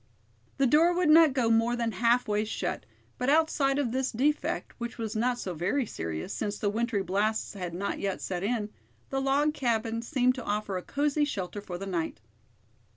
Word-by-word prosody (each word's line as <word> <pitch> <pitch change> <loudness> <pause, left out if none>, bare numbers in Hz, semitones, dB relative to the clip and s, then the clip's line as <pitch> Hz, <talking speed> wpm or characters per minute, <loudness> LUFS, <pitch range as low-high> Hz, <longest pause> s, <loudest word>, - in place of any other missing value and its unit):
The 275 - +3
door 320 +7 +4
would 350 -4 +3
not 320 -1 +7
go 250 -4 +1
more 230 +2 +3
than 235 -1 -1
half 235 +4 +2
way 210 0 +1
shut, 220 - -3 0.3
but 250 +2 0
outside 290 -3 +3
of 275 -5 0
this 260 +1 -1
defect, 285 +6 0
which 235 0 -5
was 225 -2 -4
not 240 +3 +1
so 185 -6 -4
very 195 - 0
serious, 80 - -5
since 205 -1 -3
the 205 - 0
wintry 225 -2 0
blasts 205 +5 0
had 180 -4 -5
not 200 +3 -3
yet 195 -2 -2
set 180 -2 -3
in, 210 0 -1 0.4
the 270 0 0
log 285 +3 +2
cabin 230 -4 -1
seemed 255 0 +2
to 255 -2 -7
offer 205 -2 -2
a 180 - -2
cozy 295 +6 0
shelter 205 -8 -3
for 180 -3 -6
the 195 - -6
night. 170 - -3
230 Hz, 195 wpm, -28 LUFS, 205-270 Hz, 0.4 s, not